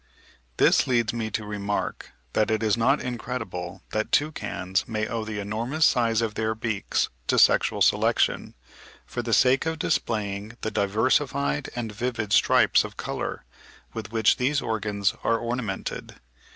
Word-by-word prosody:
This - - +4
leads 120 -3 +1
me 115 -2 -2
to 105 +1 -3
remark 105 -1 -3 0.2
that 110 +1 +2
it 110 0 0
is 110 -2 +3
not 130 +5 +2
incredible 105 -7 -5
that 110 0 -2
toucans 95 - 0
may 110 -1 -2
owe 115 -1 -3
the 110 -1 -5
enormous 115 +10 0
size 115 -2 +2
of 110 -2 -2
their 110 0 -1
beaks 110 -2 -1 0.2
to - - +2
sexual - - +4
selection, - - +2 0.5
for 120 - -4
the 120 -1 -4
sake 130 +6 +4
of 160 0 -1
displaying 105 -5 -2
the 110 - -2
diversified 130 +7 +1
and 115 -3 -3
vivid 115 -1 -3
stripes - - +5
of - - -9
colour, - - -4 0.5
with 110 -1 -6
which 110 -2 +3
these 140 +3 +1
organs 105 -4 -1
are 115 - +2
ornamented. 115 -4 -4
110 Hz, 150 wpm, -25 LUFS, 105-120 Hz, 0.5 s, stripes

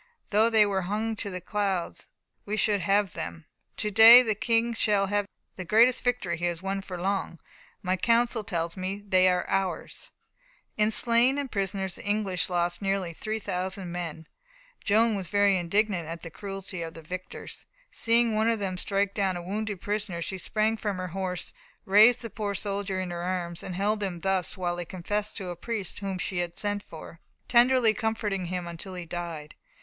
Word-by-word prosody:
"Though 220 +2 +4
they 220 -2 +5
were 195 -2 0
hung 215 +4 -2
to 205 - -4
the 185 -1 -5
clouds, 195 -2 -2 0.4
we 210 +1 -3
should 205 -1 +2
have 200 -2 +2
them. 80 0 -6 0.3
To 210 - -1
day 225 +4 +10
the 220 -3 +1
King 235 +1 +1
shall 210 -3 +2
have 205 0 0 0.3
the 185 - -4
greatest 230 +7 +4
victory 230 -9 0
he 175 - -2
has 175 -1 -1
won 195 0 -2
for 185 -2 -7
long. 190 -2 -2 0.4
My 185 0 +1
counsel 235 +2 +2
tells 170 -5 -2
me 190 +2 -4
they 185 -1 +5
are 180 -1 +1
ours." 195 -2 -2 0.7
In 210 0 +3
slain 235 +4 +4
and 280 -2 -3
prisoners 195 -2 -2
the - - -10
English 205 -4 0
lost 175 0 0
nearly 195 -3 -1
3,000 190 -2 -4
men. 165 -2 -5 0.6
Joan 220 +2 +3
was 195 -3 -3
very 205 0 +3
indignant 185 -1 0
at 165 0 -7
the 165 - -7
cruelty 195 -1 -6
of 165 -1 -6
the 165 - -10
victors. 185 +3 -8 0.2
Seeing 230 0 +3
one 220 +1 +2
of 230 - +1
them 190 -3 -3
strike 200 0 0
down 190 -3 0
a 175 - -6
wounded 205 +1 -3
prisoner 205 -4 -2
she 190 +2 -5
sprang 220 +3 0
from 205 -3 -2
her 185 0 -4
horse, 185 0 -4 0.3
raised 220 +5 +6
the 230 - -6
poor 205 -3 -3
soldier 200 -1 -2
in 185 -1 -3
her 170 0 -4
arms, 175 -1 -3
and 185 - -6
held 210 +3 0
him 180 -4 -3
thus 190 -1 0
while 175 -1 -1
he 175 - -2
confessed 205 +4 -3
to 190 -4 -5
a 175 - -4
priest 205 +1 -4
whom 195 -2 -3
she 180 +1 -2
had 175 -1 -3
sent 205 -1 -1
for, 165 -2 -11 0.3
tenderly 245 -2 +5
comforting 210 -4 -2
him 180 0 -3
until 170 +2 -6
he 180 -1 -6
died. 165 -3 -6
195 Hz, 190 wpm, -27 LUFS, 180-215 Hz, 0.7 s, day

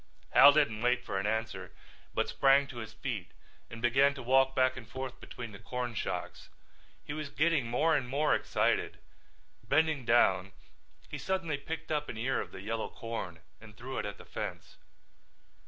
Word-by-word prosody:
Hal 140 +1 +9
didn't 130 -8 +2
wait 125 +1 +1
for 95 - -2
an 100 - -1
answer 110 +1 -2 0.4
but - - +1
sprang 140 +1 +4
to 135 -3 -10
his 110 -2 -7
feet 110 -5 -5 0.4
and 115 0 -9
began 135 +4 +4
to 135 - -7
walk 135 +2 +4
back 130 0 +3
and 115 -4 -10
forth 130 0 -6
between 120 -2 -8
the 100 - -11
corn 125 -1 -4
shocks. - - -4 0.6
He - - -4
was 155 -2 -4
getting 155 -5 +1
more 155 +7 +2
and 130 -4 -1
more 145 +3 +2
excited. - - +1 0.6
Bending 155 -2 +2
down 95 -5 +3 0.6
suddenly 165 -1 -1
he - - -17
picked 160 +1 -5
up 150 -1 -1
an 110 - -6
ear 130 +4 0
of - - -8
the - - -9
yellow 110 +2 -3
corn 95 -8 -6 0.2
and 105 -1 -14
threw 130 +2 -5
it - - -3
at 100 - -7
the - - -13
fence. - - -6
125 Hz, 180 wpm, -31 LUFS, 110-140 Hz, 0.6 s, Hal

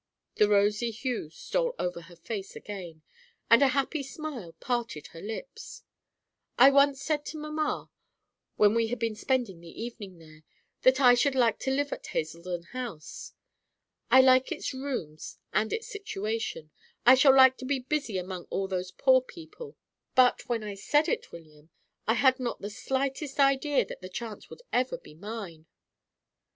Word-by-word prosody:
The 210 - +4
rosy 210 +3 +3
hue 230 - -4
stole - - -2
over 180 -1 -3
her 170 +1 -15
face 195 +3 -6
again, 175 -6 -8 0.5
and 230 - +8
a 280 - +6
happy 275 +3 0
smile 275 - -7
parted 235 - -3
her 165 - -10
lips. 225 - -8 0.7
"I 265 +3 +8
once 280 0 +4
said 295 +1 -1
to 315 - -6
mamma, 305 0 -3 0.6
when 210 0 +5
we 230 0 +2
had 245 +2 -3
been 230 -1 -1
spending 230 -5 -1
the 170 - -12
evening 220 -5 -7
there, 155 -1 -16 0.4
that 260 +1 +5
I 250 -3 +7
should 265 +3 +2
like 240 -3 +3
to - - -2
live 285 +1 0
at - - -8
Hazeldon 170 +2 -4
House. 240 -12 -7 0.8
I 260 - +8
like 260 0 +4
its - - -3
rooms 250 - -5 0.2
and 215 +5 +1
its 455 - -2
situation; 220 - -4 0.3
I 250 - +9
shall 265 +1 +6
like 260 -1 +8
to 260 - -8
be 280 +1 0
busy 260 -5 -2
among 180 -1 -5
all 195 - -2
those 185 -1 -3
poor 260 +9 +3
old 255 -1 +3
people, 420 +7 -11 0.4
but, 255 -1 +4
when 230 -2 -1
I 210 -1 -5
said 295 +10 +1
it, - - -2
William, 155 -2 -14 0.4
I 225 - +3
had 260 +3 +4
not 245 -2 -3
the 205 - -6
slightest 270 +5 -3
idea 275 +1 +3
that - - -9
the 185 - -8
chance 225 +2 -7
would 485 - -12
ever 255 +1 +1
be - - -15
mine." 180 -3 -8
240 Hz, 170 wpm, -28 LUFS, 190-270 Hz, 0.8 s, I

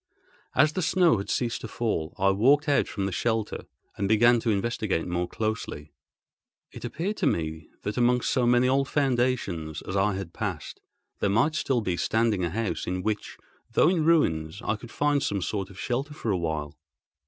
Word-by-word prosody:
As 150 +3 +4
the 185 - -1
snow 170 - +3
had 100 - -5
ceased 120 -2 -1
to - - -5
fall, 105 -8 -2
I 95 +1 +3
walked 135 +10 +3
out 145 - +3
from 100 -2 -3
the 95 - -2
shelter 110 +2 -1 0.3
and 100 -1 -2
began 120 +2 +5
to 115 - -1
investigate 105 -4 0
more 90 0 -1
closely. 105 -9 -4 0.8
It - - -10
appeared 195 +7 -3
to 180 - +1
me 80 - -2
that, 105 +3 -3
amongst 125 0 +2
so 125 -3 +2
many 120 +1 +4
old 135 +1 +2
foundations 120 - 0
as 95 - -5
I 100 0 +2
had 95 -3 -6
passed, - - -5 0.4
there 100 - +1
might 115 +10 +3
be - - -9
still 125 -7 0
standing 110 -3 +1
a 85 - 0
house 110 +3 -2
in 90 0 -2
which, 105 -1 -3 0.4
though 155 - +5
in 175 -4 +1
ruins, 90 - +2
I 110 - 0
could 115 +2 -11
find 145 +2 +1
some 100 -5 -1
sort 95 +1 -3
of 95 - -14
shelter 135 +7 -2
for 115 - -2
a - - +2
while. 80 -3 -3
110 Hz, 190 wpm, -27 LUFS, 95-130 Hz, 0.8 s, began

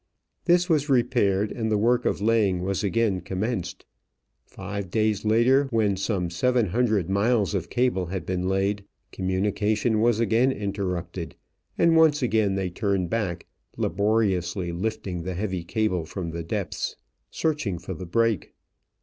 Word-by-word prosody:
This 175 0 +4
was 150 -4 +1
repaired 115 -6 +2
and 110 -2 -2
the 105 - +3
work 120 +4 +2
of - - 0
laying 105 -5 +2
was 95 +2 -1
again 100 -2 +1
commenced. 95 +1 -3 0.6
Five 100 0 -6
days 110 0 +1
later, 120 +6 +4
when 110 -5 +1
some 95 -3 -2
seven 120 +4 +1
hundred 110 -4 +1
miles 105 +2 +1
of 85 -4 -2
cable 120 -8 +1
had 90 -2 -4
been 90 +1 -1
laid, 100 +1 0 0.3
communication 105 +4 0
was 115 -1 +3
again 115 +4 +3
interrupted, 95 -5 -4 0.4
and 170 -1 +4
once 155 -3 +4
again 110 -4 +2
they 95 -2 -2
turned 95 -2 -1
back, 105 -7 -2 0.3
laboriously 95 -2 0
lifting 95 -1 -3
the 90 +2 -4
heavy 95 -2 -2
cable 95 -2 0
from 85 0 -5
the 85 +1 -4
depths, 80 - -3 0.3
searching 150 - -1
for 90 +3 -6
the 90 +1 -7
break. 115 +3 0
100 Hz, 145 wpm, -25 LUFS, 95-115 Hz, 0.6 s, This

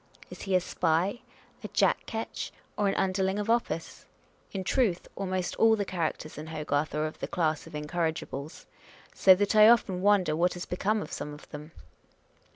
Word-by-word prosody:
Is - - -9
he 195 -1 0
a - - +6
spy, 180 +5 0 0.4
a - - -4
jack - - +1
ketch, 225 0 -4 0.2
or 205 - +1
an 195 - +1
underling 190 +1 0
of 210 +2 0
office? 230 -8 -2 0.4
In 190 -1 -4
truth, 195 -4 +1
almost 185 -2 -2
all 225 0 +5
the 205 -2 -2
characters 160 -4 -3
in 155 - -7
Hogarth 155 -1 -2
are 155 0 0
of 155 - -6
the - - -3
class 155 -3 -1
of - - -13
incorrigibles; 155 -1 -3 0.5
so 190 -1 +7
that 205 +3 0
I 215 +1 +9
often 195 -6 +3
wonder 190 -6 +3
what 175 +3 +1
has 175 - -5
become 205 +4 -1
of - - -10
some 150 0 -5
of 150 - -15
them. 150 +2 -9
180 Hz, 180 wpm, -28 LUFS, 155-200 Hz, 0.5 s, I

